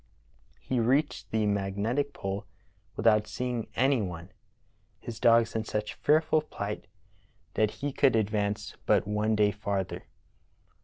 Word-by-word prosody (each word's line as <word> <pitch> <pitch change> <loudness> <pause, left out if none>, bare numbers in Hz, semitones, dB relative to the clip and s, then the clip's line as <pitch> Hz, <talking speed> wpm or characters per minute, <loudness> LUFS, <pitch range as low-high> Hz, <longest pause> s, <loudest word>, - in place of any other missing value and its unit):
He 130 - -1
reached 135 +6 +1
the 110 -1 +1
magnetic 105 +7 0
pole 100 -3 -5 0.5
without 110 -1 +3
seeing 120 +1 -3
any 130 -1 +3
one, 90 -2 -6 0.7
his 115 -2 -7
dogs 115 -1 +4
in 110 - 0
such 105 -1 -3
fearful 155 +1 +3
plight 105 -8 -5 0.7
that 110 -1 +2 0.2
he 145 - -1
could 135 -4 +4
ad 110 -2 +1
vance 105 -1 -2
but - - +4
one 105 +1 +1
day 105 -1 +3
farther. 100 -2 -3
110 Hz, 135 wpm, -29 LUFS, 100-120 Hz, 0.7 s, dogs